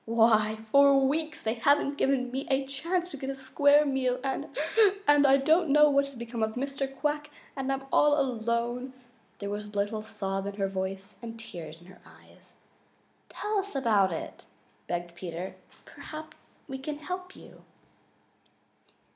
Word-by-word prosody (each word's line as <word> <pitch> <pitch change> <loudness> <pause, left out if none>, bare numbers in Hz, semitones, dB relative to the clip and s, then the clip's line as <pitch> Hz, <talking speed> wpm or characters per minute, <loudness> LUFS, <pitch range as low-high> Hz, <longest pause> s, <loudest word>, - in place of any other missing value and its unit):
Why, 220 -1 +3
for 280 0 +7
weeks 310 +3 -2
they 220 - 0
haven't 280 +3 +2
given 260 -2 +1
me 265 +2 -4
a 270 0 +1
chance 335 +7 -2
to 285 - -6
get 265 0 -5
a 275 - -3
square 285 +2 +4
meal, 260 -2 0
and 270 -1 -2 0.6
and 290 -1 +6
I 270 0 +6
don't 315 +4 +3
know 300 +1 +6
what 280 0 +3
has 275 -1 -9
become 235 -1 -5
of 220 0 0
Mr. 275 +1 -3
Quack, 295 +2 -2 0.3
and 270 -1 -2
I'm 270 0 -2
all 295 0 +5
alone!" 240 0 -1 0.4
There 200 0 -5
was 210 +1 -4
a 205 0 -8
little 205 +2 -1
sob 195 -2 -3
in 200 - -5
her 195 -1 0
voice 190 +1 -4
and 230 -1 -8
tears 165 -8 -9
in 175 - -18
her 185 +1 -16
eyes. - - -20 0.7
"Tell 420 -1 -2
us 395 -3 -5
all 270 - -1
about 205 -5 +4
it," 165 - -7 0.4
begged 175 0 -3
Peter. 180 +1 -6 0.3
"Perhaps 310 0 -11
we 265 0 -6
can 290 +2 -5
help 365 +4 -6
you." - - -15
265 Hz, 170 wpm, -28 LUFS, 215-285 Hz, 0.7 s, for